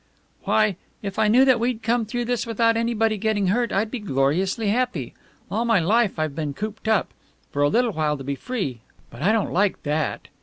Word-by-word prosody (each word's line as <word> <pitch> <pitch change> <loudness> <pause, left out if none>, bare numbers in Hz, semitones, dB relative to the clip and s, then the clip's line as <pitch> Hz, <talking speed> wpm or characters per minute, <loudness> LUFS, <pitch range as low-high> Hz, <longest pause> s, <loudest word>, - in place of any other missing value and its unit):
"Why, 215 -4 +2 0.3
if 200 0 -4
I 220 - +4
knew 250 +5 +5
that 260 -3 +4
we'd 235 -1 -1
come 230 -1 +1
through 240 +2 -2
this 240 0 -1
without 230 0 +2
anybody 225 -2 +1
getting 205 -3 +1
hurt 235 +4 +1
I'd 215 +3 0
be 255 - -3
gloriously 185 +5 0
happy. 250 +3 -1 0.4
All 225 - 0
my 230 -4 +3
life 210 +4 +2
I've 155 -2 -1
been 150 -3 -3
cooped 215 +3 -6
up. 220 -2 +2 0.4
For 145 - -2
a 145 - +4
little 240 +7 +2
while 155 -4 0
to 135 - -8
be 140 +1 -2
free! 140 - -4 0.3
But - - -11
I 200 - +3
don't 220 -2 0
like 200 +2 +1
that." 150 0 -2
215 Hz, 205 wpm, -23 LUFS, 175-230 Hz, 0.4 s, knew